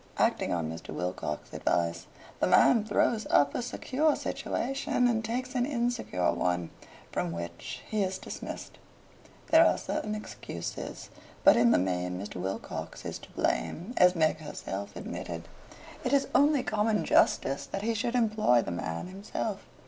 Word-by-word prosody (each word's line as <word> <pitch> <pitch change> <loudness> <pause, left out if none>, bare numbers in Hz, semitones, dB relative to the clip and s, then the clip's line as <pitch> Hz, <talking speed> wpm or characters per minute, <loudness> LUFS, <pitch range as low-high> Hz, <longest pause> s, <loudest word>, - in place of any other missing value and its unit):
Acting - - +2
on 85 -3 0
Mr. 80 +1 -7
Wilcox's 90 -4 -4
advice, 85 0 0 0.3
the - - +2
man 230 -4 +6
throws 215 +1 +1
up 145 0 +4
a - - -1
secure 275 +5 +1
situation 260 -1 -1
and 225 -2 +1
takes 250 +3 -3
an 250 -2 +1
insecure 240 - 0
one, 90 -2 -1 0.4
from 85 - -1
which 85 0 -6
he 215 -1 0
is 190 -1 0
dismissed. - - -7 0.7
There 320 +1 +8
are - - +4
certain 215 0 -3
excuses, 215 - -6 0.3
but - - +8
in 120 0 +5
the - - +5
main 90 0 -1
Mr. 100 0 -6
Wilcox 95 +1 -5
is - - -4
to - - -14
blame, 185 +10 -1
as 180 0 +6
Meg 160 -2 +3
herself 100 -10 -6
admitted. 85 -1 -6 0.6
It - - 0
is 280 -1 +3
only 285 -2 +4
common 215 0 +1
justice 135 +1 +3
that 195 - -4
he 230 +1 +1
should 235 +2 -1
employ 215 - +3
the - - -4
man 85 -1 -3
himself. 200 +2 -4
190 Hz, 155 wpm, -29 LUFS, -, 0.7 s, There